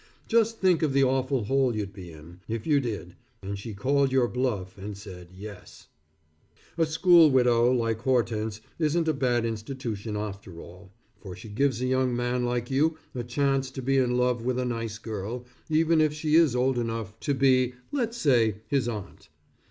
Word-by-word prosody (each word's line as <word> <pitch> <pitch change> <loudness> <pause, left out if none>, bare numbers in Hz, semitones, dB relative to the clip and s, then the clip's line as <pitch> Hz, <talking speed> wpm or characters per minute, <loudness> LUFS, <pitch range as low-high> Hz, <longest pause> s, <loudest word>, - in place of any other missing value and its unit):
Just 230 -1 +2
think 185 -4 +3
of 150 -4 +1
the 135 0 +4
awful 130 -1 +1
hole 130 +1 +1
you'd 100 -2 -4
be 90 -3 -10
in, 80 +3 -13
if 115 -1 -4
you 150 -3 +3
did, 105 -8 -5 0.3
and 100 +1 -5
she 105 +1 -7
called 135 +6 +1
your 130 -2 +3
bluff 115 -8 -2
and 100 0 -7
said, 95 -4 -10
"Yes." 100 +1 -11 0.9
A 165 -1 +1
school 165 0 +6
widow 125 -2 +4
like 115 -3 0
Hortense, 110 -4 0 0.2
isn't 160 +1 +1
a 155 - +3
bad 120 -4 +1
institution 110 -2 -4
after 100 -4 -6
all, 90 +3 -13 0.3
for 95 -4 -9
she 95 +5 -11
gives 125 +2 0
a - - +1
young 130 -1 +1
man 125 +1 -1
like 120 +1 -2
you 155 +4 +2 0.2
a 125 - -4
chance 135 +2 0
to 130 0 -7
be 135 +1 +2
in 125 -2 +2
a 125 - 0
love 125 -1 +1
with 125 0 -1
a 125 - -1
nice 115 -2 -3
girl, 115 +2 -5 0.2
even 160 +1 +3
if 155 -1 +2
she 150 0 -2
is 160 -6 +5
old 125 0 +1
enough 115 -2 -4
to 140 - -1
be, 130 -2 +3 0.2
let's 240 -4 -2
say, 120 - +3
his 135 -4 +1
aunt. 105 -4 -8
125 Hz, 190 wpm, -27 LUFS, 110-135 Hz, 0.9 s, school